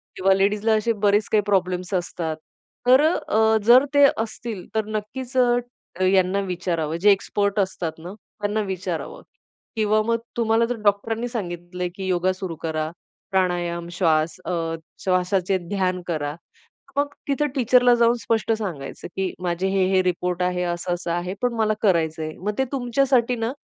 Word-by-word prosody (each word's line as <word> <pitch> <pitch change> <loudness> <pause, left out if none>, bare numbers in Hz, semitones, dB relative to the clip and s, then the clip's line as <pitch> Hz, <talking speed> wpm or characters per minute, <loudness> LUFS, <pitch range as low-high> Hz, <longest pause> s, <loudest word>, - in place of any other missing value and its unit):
किंवा 190 +1 +3
लेडीजला 205 +3 +2
असे 220 +2 +1
बरेच 205 +1 +3
काही 215 - +4
प्रॉब्लेम्स 185 -1 0
असतात. 170 -2 -2 0.5
तर 260 +2 +7
अ, 220 -8 +2
जर 245 +5 +7
ते 285 0 +6 0.2
असतील 220 -3 -7
तर 220 -1 +1
नक्कीच 250 +5 -5
अ, 245 -6 0
यांना 185 +1 +3
विचारावं 165 -3 -2
जे 205 +4 +5
एक्सपर्ट 200 +1 0
असतात 185 -4 -1
ना, 175 +4 -8
त्यांना 210 0 -4
विचारावं. 185 -4 -4 0.5
किंवा 215 -1 +2
मग 230 0 +2 0.2
तुम्हाला 225 0 +3
जर 245 +1 -2
डॉक्टरांनी 220 +3 +1
सांगितलंय 180 -5 -4
की 190 -1 -5
योगा 185 0 +1
सुरू 185 -3 -5
करा, 155 -1 -2 0.4
प्राणायाम, 175 -2 0
श्वास 165 -2 +1
अ, 165 -2 -2 0.3
श्वासाचे 185 0 +1
ध्यान 185 -2 0
करा. 150 -3 -2 0.6
मग 285 0 0
तिथे 285 +1 +1
टीचरला 250 -1 +5
जाऊन 235 0 +4
स्पष्ट 225 0 0
सांगायचं 180 -11 -5
की 190 -1 -1
माझे 175 +1 -1
हे, 190 -1 +2
हे 190 - +5
रिपोर्ट 180 0 -1
आहे. 180 0 0
असं-असं 175 0 -2
आहे 175 +2 -2
पण 245 -1 +1
मला 220 -1 +2
करायचंय. 160 -5 +1
मग 210 +3 -3
ते 265 - +3
तुमच्यासाठी 250 -1 +2
ना 225 +1 -1
195 Hz, 150 wpm, -23 LUFS, 175-225 Hz, 0.6 s, तर